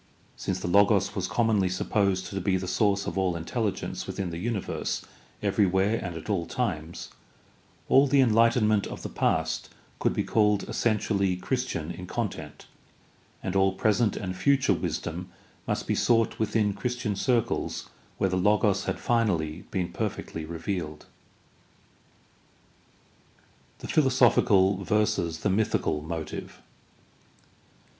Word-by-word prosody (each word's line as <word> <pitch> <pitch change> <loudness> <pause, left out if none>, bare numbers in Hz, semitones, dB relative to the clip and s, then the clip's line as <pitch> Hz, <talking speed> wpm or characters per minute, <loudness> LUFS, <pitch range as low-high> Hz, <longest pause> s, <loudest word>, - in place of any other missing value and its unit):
Since - - -3
the - - -3
Logos 100 +3 +4
was - - -2
commonly 110 -5 +2
supposed 95 0 0
to 95 -1 -4
be 95 +1 +1
the 95 0 -5
source 100 0 +1
of - - -2
all 95 -2 +1
intelligence 100 +5 -3
within 95 -3 -3
the 85 - -5
universe 105 0 -3 0.4
everywhere 100 +1 +2
and 90 -3 -5
at 80 - -8
all 95 -6 -1
times, 85 -9 -3 0.8
all 135 +2 +6
the 140 +1 +3
enhghtenment 115 -3 +4
of - - -8
the - - -4
past - - 0 0.3
could - - +1
be - - +1
called 105 -2 +2
essentially 100 -4 0
Christian 90 - -2
in 90 - -8
content - - -5 0.8
and 95 - -3
all 95 0 +3
present 110 +2 +1
and 95 -2 -4
future 135 +8 +3
wisdom 85 +3 -4 0.4
must - - -1
be - - 0
sought 115 -2 +2
within 110 -1 +1
Christian 120 -1 -2
circles 120 +3 0 0.3
where 95 - +1
the 90 - +1
Logos 105 0 +2
had - - -2
finally 90 -9 0
been 90 -3 -2
perfectly 80 -1 -4
revealed. 85 -1 -4 2.7
The - - -8
philosophical 110 -8 +4
versus 85 -5 0
the 100 - +1
mythical 95 -7 0
motive. 80 -1 -6
100 Hz, 130 wpm, -27 LUFS, 90-110 Hz, 2.7 s, all